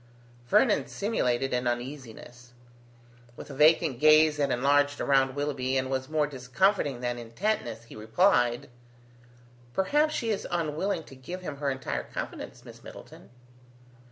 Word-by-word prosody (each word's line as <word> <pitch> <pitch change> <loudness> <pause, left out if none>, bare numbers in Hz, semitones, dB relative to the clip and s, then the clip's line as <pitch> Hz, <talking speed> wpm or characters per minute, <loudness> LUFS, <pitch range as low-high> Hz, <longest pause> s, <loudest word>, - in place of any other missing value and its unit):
Vernon 210 - +3
simulated 135 - -1
an 125 0 0
uneasiness. 120 -1 -6 0.8
With - - -10
a - - -7
vacant 150 -2 +3
gaze 155 0 +5
that 145 -1 +1
enlarged 145 +3 +2
around 135 -1 +2
Willoughby 135 -2 -1
and 130 0 -2
was 130 0 -2
more 155 -1 +1
discomforting 140 +1 0
than 120 -1 -2
intentness, 120 - -3
he 120 - -14
replied: 120 - +1 1.1
"Perhaps 295 +11 +2
she 230 -1 -1
is 205 - -3
unwilling 170 +2 -2
to 135 - -14
give 175 +8 -8
him 150 -5 -6
her 140 0 -1
entire 130 -1 -3
confidence, - - -7
Miss - - -13
Middleton." - - -13
140 Hz, 135 wpm, -28 LUFS, 125-160 Hz, 1.1 s, gaze